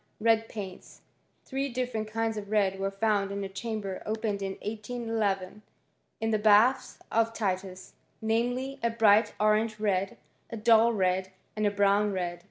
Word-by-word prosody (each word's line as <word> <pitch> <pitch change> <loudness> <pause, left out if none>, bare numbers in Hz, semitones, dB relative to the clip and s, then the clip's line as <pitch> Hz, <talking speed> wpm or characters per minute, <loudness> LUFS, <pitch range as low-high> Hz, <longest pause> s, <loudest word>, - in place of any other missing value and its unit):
Red 225 0 +2
paints* 190 -4 -8 0.4
Three 275 +1 -2
different 245 -3 -3
kinds 225 0 -1
of 205 -1 -6
red 205 -3 +2 0.2
found 205 -2 +1
in 200 0 -3
a - - -3
chamber 200 -1 -5
opened 215 -2 -2
in 195 0 -3
1811, 210 -3 -3 0.6
in 225 0 -1
the 215 - +2
bat] 215 +5 +5 0.5
Titus, 185 -2 -3 0.3
namely, 245 +5 -1
a 235 - +2
bright 215 -1 +4
orange 215 +1 +2
red, 195 -2 0 0.3
a 230 - -6
dull 225 +1 +5
red, 190 -2 0 0.4
brown 205 +1 +3
red. 175 -2 -3
215 Hz, 135 wpm, -28 LUFS, 195-225 Hz, 0.6 s, bat